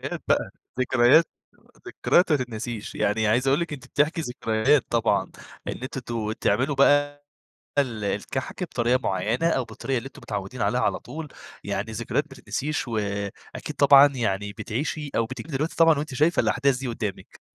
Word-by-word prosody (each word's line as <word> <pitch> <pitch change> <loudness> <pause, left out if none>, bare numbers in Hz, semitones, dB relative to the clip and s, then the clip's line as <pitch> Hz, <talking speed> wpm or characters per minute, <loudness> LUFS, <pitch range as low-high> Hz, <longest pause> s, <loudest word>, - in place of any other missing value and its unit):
ذكريات - - -5
بقى - - +2 0.3
ذكريات 130 +6 +5 0.6
ذكريات 175 -1 +2
ما 150 - +5
تتنسيش، 115 -3 -5
يعني 110 +1 +1
عايز 120 +5 +2
أقول 135 +2 +4
لِك 170 -3 -3
أنتِ 135 - -8
بتحكي 155 +3 +1
ذكريات 125 +1 +1
طبعًا، 115 -1 +1 0.4
إن - - -1
أنتم 130 0 -5
ت 120 - -9 0.3
بتعملوا 140 +3 +1
بقى 145 +1 +3 0.6
ال 115 -6 0
الكحك 100 - -3
بطريقة 120 +2 +1
مُعيّنة، 110 - 0
أو 130 -6 +1
بالطريقة 120 +3 -3
اللي 120 - -7
أنتم 135 - -11
متعودين 105 +4 -4
عليها 125 - +1
على - - +1
طول، 155 -1 -8 0.4
يعني 110 +3 -3
ذكريات 120 +6 -1
ما 135 - -11
تتنسيش، 145 +1 -3
وأكيد 100 -3 -4
طبعًا 140 0 +8
يعني 105 -4 -1
بتعيشي 140 +7 -4
أو 115 - +2
بتيجي 130 +4 -8
دلوقتي 150 +4 -2
طبعًا 165 -2 +5
وأنتِ 145 -2 -4
شايفة 155 +6 +3
الأحداث 135 -1 +2
دي 130 -1 -4
قدّامِك. 105 -4 -5
130 Hz, 165 wpm, -25 LUFS, 110-145 Hz, 0.6 s, طبعًا